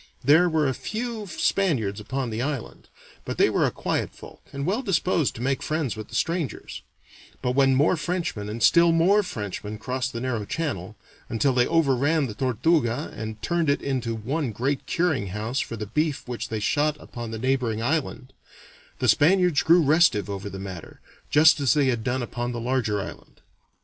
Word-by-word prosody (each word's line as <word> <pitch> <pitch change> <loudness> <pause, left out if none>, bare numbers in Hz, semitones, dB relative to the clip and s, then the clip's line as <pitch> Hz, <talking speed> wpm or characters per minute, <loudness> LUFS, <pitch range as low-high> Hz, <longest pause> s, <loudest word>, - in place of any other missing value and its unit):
There 160 +7 +5
were 155 -3 +2
a 130 - 0
few 220 - -4
Spaniards 140 - 0
upon 130 +3 -3
the 110 +2 -3
island, 140 -2 -4 0.4
but - - -5
they - - +4
were - - +2
a - - +1
quiet - - -2
folk, - - -13
and 140 0 -4
well 205 +8 0
disposed 185 - +1
to 115 - -6
make 135 +1 0
friends 155 -6 -2
with 110 -1 -7
the - - -9
strangers; 165 -4 -2 0.6
but 125 - +1
when 135 0 +3
more 145 +7 +3
Frenchmen 165 - -3
and 110 +2 -4
still 170 0 +6
more 180 +6 +4
Frenchmen 105 - -5
crossed 130 +3 -3
the 115 - -5
narrow 120 -3 -2
channel, 110 - -4 0.3
until 130 +4 +1
they 125 -1 +3
overran 150 -1 +2
the 115 - -5
Tortuga 125 +2 0
and 110 0 -6
turned 170 -3 +1
it 140 - +1
into 125 -4 -2
one 130 +5 -2
great 130 +6 -2
curing 160 - 0
house 110 +7 -3
for 115 - -4
the 105 - -4
beef 150 +6 -1
which 125 -1 -5
they 110 - -2
shot 150 +7 +1
upon 120 -1 -8
the 110 - -5
neighboring 120 -2 0
island, 135 -2 -2 0.6
the - - -1
Spaniards 180 0 +4
grew 170 +1 +5
restive 145 -9 +3
over 100 0 -5
the 95 - -7
matter, 95 -3 -8 0.3
just 150 0 +6
as 135 -5 +3
they 145 -2 +3
had 120 -3 -1
done 125 +1 -1
upon 120 +1 -4
the 120 - -4
larger 115 -4 0
island. 95 - -9
130 Hz, 185 wpm, -25 LUFS, 115-160 Hz, 0.6 s, still